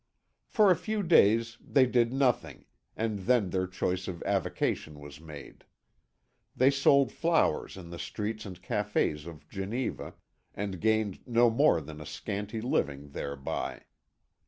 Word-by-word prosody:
For 210 -4 +4
a - - +5
few 215 +3 -2
days 115 - +4
they 135 -2 +4
did 120 -1 +2
nothing, 130 -2 0 0.3
and 110 -2 -1
then 105 -2 +2
their 95 0 0
choice 90 0 -2
of 85 -3 -5
avocation 90 -5 -1
was 75 +1 -11
made. 75 -3 -11 0.9
They 130 +2 +5
sold 140 0 +4
flowers 165 - +1
in 85 -2 -10
the 85 - -7
streets 105 +1 -4
and 90 -4 -9
cafés 100 -8 -1
of 80 -3 -11
Geneva, 105 +6 -4 0.4
and 100 -3 -4
gained 110 -3 +1
no 120 -1 +4
more 115 - +4
than 75 +1 -9
a 75 - -8
scanty 105 +8 -4
living 70 - -1
thereby. 70 -1 -4
105 Hz, 140 wpm, -29 LUFS, 85-120 Hz, 0.9 s, a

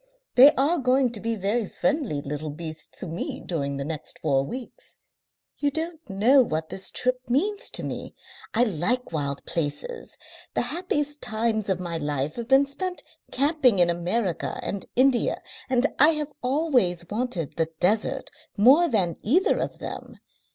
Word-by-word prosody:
"They 270 +4 +9
are 305 +6 +2
going 255 -1 +3
to 225 - -7
be 230 +2 -1
very 210 +2 -1
friendly 265 - -1
little 150 +2 -4
beasts 160 +1 -8
to - - -6
me 165 0 -4
during 140 -5 -3
the 140 - -3
next 155 -1 -5
four 135 -3 +1
weeks.... 255 - -9 0.6
You 290 - +1
don't 320 +3 -3
know 230 +8 +5
what 160 -8 -2
this 190 - -2
trip 255 0 -1
means 400 - +1
to - - -4
me. - - -5 0.4
I 235 - +5
like 220 +4 0
wild 140 -3 -3
places. 170 - -4 0.4
The - - +2
happiest 295 -4 -2
times 220 -2 0
of 190 -2 +1
my 170 -2 -3
life 145 -1 -2
have 235 -1 -4
been 270 +2 +5
spent 360 +6 -4 0.3
camping 275 - +3
in 175 -1 +4
America 175 +2 -1
and 200 - -4
India, 255 -1 +3 0.3
and 255 0 +3
I 295 +3 +8
have 300 -1 -3
always 250 - +1
wanted 210 - -3
the 165 -1 +1
desert 215 +8 +1 0.3
more 270 +12 +6
than 185 -8 +1
either 335 - +3
of - - -3
them. - - -7
230 Hz, 160 wpm, -25 LUFS, 170-275 Hz, 0.6 s, They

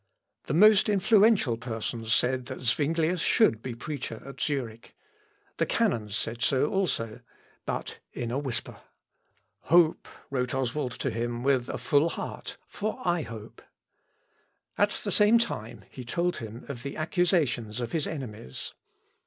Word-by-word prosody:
The 145 - 0
most 210 +3 +6
influential 205 - +4
persons 115 -1 -4
said, 125 +1 +2
that 130 - -6
Zuinglius 160 +7 +1
should 165 - +3
be 125 -1 -5
preacher 125 -3 -5
at 140 - -9
Zurich. 120 -6 -3 0.6
The - - +1
canons 115 - 0
said 115 +1 -4
so 130 +2 +3
also, 150 - -1 0.5
but - - -4
in 120 -1 -4
a 130 - 0
whisper. 130 -5 -4 0.9
"Hope," 170 -2 +4 0.2
wrote 125 -1 -1
Oswald 130 0 -1
to 135 - -2
him 120 +1 -2
with 130 -2 +2
a - - -2
full 145 +3 +3
heart, - - -6
"for 215 +4 -4
I 175 -1 +2
hope." 110 -6 -9 1.1
At - - +3
the - - -4
same 210 +3 +5
time 110 - -3
he 130 - -8
told 170 +9 -1
him 115 +1 -8
of 135 -4 -6
the 140 +2 -6
accusations 155 - +1
of 120 -2 -3
his 160 -3 -1
enemies. 110 - -6
130 Hz, 145 wpm, -28 LUFS, 115-170 Hz, 1.1 s, most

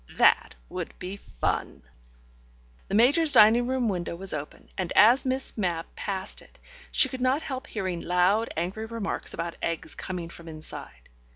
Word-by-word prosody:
That - - +4
would - - -6
be 185 +2 -5
fun! - - -3 1.0
The 195 - -1
Major's 290 +8 +5
dining 235 0 +7
room 260 -2 +1
window 175 -4 -2
was 190 +2 0
open, 150 -1 -6
and 180 -2 -3
as 245 +5 +6
Miss 260 +1 -1
Mapp 175 -6 -2
passed 190 -2 -3
it, - - -19 0.3
she - - +5
could 260 -1 -6
not 260 +4 +2
help 265 +1 -5
hearing 185 -5 -3
loud, 185 +6 +2
angry 190 +7 -2
remarks 225 -3 -3
about 170 0 -4
eggs 165 -1 -2
coming 175 -3 -5
from 170 0 -12
inside. 155 - -9
195 Hz, 160 wpm, -27 LUFS, 170-240 Hz, 1.0 s, dining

